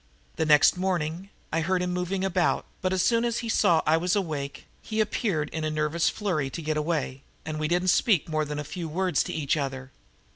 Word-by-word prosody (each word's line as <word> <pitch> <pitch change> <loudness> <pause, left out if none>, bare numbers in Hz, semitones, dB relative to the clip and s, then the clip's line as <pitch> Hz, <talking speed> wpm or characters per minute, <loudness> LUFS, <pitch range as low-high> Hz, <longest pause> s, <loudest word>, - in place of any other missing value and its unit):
The 160 - 0
next 150 +3 +6
morning 180 0 -2 0.2
I 165 - +2
heard 180 +2 +1
him 180 0 -1
moving 180 +2 -2
about, 180 -2 +1 0.2
but 185 - 0
as 185 -1 +1
soon 230 -1 +3
as 235 -1 0
he - - -4
saw 165 -6 +3
I 155 +1 +4
was 180 +3 +1
awake, 150 -8 -3 0.2
he 220 0 -4
appeared 200 -7 0
in 160 - -3
a 155 - 0
nervous 155 +2 +1
flurry 165 -10 -1
to 165 - -6
get 155 0 -1
away, 150 -4 -2 0.2
and 155 -1 -4
we 155 - 0
didn't 180 +3 +1
speak 195 - +3
more 155 -1 0
than 150 0 -4
a 150 - -3
few 165 +3 -6
words 185 +3 +1
to - - -4
each 150 -2 0
other. 135 -3 -4
165 Hz, 220 wpm, -27 LUFS, 150-185 Hz, 0.2 s, next